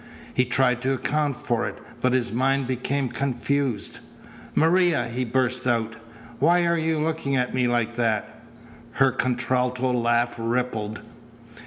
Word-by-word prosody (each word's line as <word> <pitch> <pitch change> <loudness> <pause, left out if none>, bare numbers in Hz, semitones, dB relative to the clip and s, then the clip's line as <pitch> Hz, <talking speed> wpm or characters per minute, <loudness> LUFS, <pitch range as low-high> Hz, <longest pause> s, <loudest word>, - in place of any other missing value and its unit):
He 125 - +2
tried 125 0 +2
to 135 +1 +1
account 145 0 0
for 120 -2 -1
it, - - -6 0.2
but 130 0 +2
his 120 -4 0
mind 135 +2 +1
became 130 +2 -1
confused. 135 -3 -1 0.6
"Maria!" 175 -1 +3
he 120 +2 -2
burst 125 +1 0
out. 115 -2 0 0.4
"Why 175 +4 +4
are 170 0 +2
you 160 -1 0
looking 155 -3 -1
at 125 0 0
me 125 -1 +2
like 120 -1 0
that?" 110 -3 -1 0.5
Her 135 -1 +4
contralto 125 +1 0
laugh 120 0 +1
rippled. 115 -2 -2
125 Hz, 140 wpm, -24 LUFS, 120-140 Hz, 0.6 s, Why